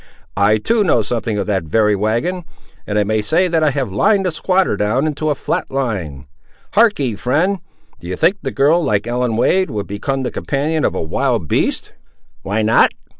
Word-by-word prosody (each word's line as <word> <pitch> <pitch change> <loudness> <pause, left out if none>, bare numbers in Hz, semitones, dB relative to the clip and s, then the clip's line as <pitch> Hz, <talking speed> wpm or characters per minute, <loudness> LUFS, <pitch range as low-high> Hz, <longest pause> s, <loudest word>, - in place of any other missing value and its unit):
I, 100 +2 +3
too, 220 - +1
know 120 - +2
something 110 -1 -2
of 100 - -1
that 100 -3 0
very 105 +6 +2
wagon, 120 - -1 0.4
and 105 - -1
I 105 - +3
may 110 +1 0
say 165 - +2
that 165 -2 +1
I 155 - +3
have 135 -6 -2
lined 195 - +2
the 180 - 0
squatter 185 - +1
down 105 +8 0
into 155 0 -2
a 150 - +1
flat - - -3
lie. 95 - -3 0.5
Harkee, 205 - +2
friend; 160 - 0 0.4
do 85 - -10
you 90 - -3
think 190 - +2
a 135 - -2
girl, 150 +6 +2
like 105 -6 0
Ellen 120 -1 -1
Wade, 185 +9 +2
would 105 -2 -4
become 130 +7 -3
the 125 - -3
companion 150 +3 -1
of - - 0
a - - -2
wild 115 - -1
beast?" - - -1 0.5
"Why 105 +3 -1
not? 110 - +4
125 Hz, 195 wpm, -18 LUFS, 105-160 Hz, 0.5 s, not